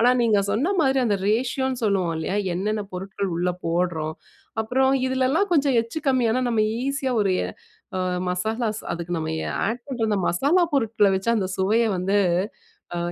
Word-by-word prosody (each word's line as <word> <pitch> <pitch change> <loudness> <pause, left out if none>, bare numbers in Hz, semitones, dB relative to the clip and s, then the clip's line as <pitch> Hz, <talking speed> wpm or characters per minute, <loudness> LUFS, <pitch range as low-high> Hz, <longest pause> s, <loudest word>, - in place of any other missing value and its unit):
ஆனா 240 +2 +5
நீங்க 215 -3 +3
சொன்ன 265 - +1
மாதிரி 270 -3 +3
அந்த 205 -4 +1
ரேஷியோன்னு 255 +3 0
சொல்லுவோம் 190 -5 +1
இல்லையா? 175 +5 -1 0.2
என்னென்ன 210 +3 -1
பொருட்கள் 195 +1 -4
உள்ள 180 +1 0
போட்றோம்? 165 -2 -1 0.5
அப்புறம் 265 +4 +2 0.2
இதுலலாம் 260 +9 +1
கொஞ்சம் 280 -5 +3
எச்சு 230 +8 -6
கம்மியானா 255 -2 +2
நம்ம 225 -2 +2 0.2
ஈஸியா 275 -1 -1
ஒரு 200 -2 +2
எ - - -2 0.5
அ - - 0 0.3
மசாலாஸ் 220 +4 -2
அதுக்கு 170 +1 -5
நம்ம 160 0 -3 0.2
எ - - -3 0.2
ஆட் 240 +2 -3
பண்ண 250 -5 -2
அந்த 205 - +1
மசாலா 285 - +3
பொருட்கல 220 -6 +3
வச்சு 190 +4 0
அந்த 190 - 0
சுவைய 215 +5 +3
வந்து, 195 +3 +1 0.8
அ - - -1
220 Hz, 165 wpm, -24 LUFS, 190-260 Hz, 0.8 s, ஆனா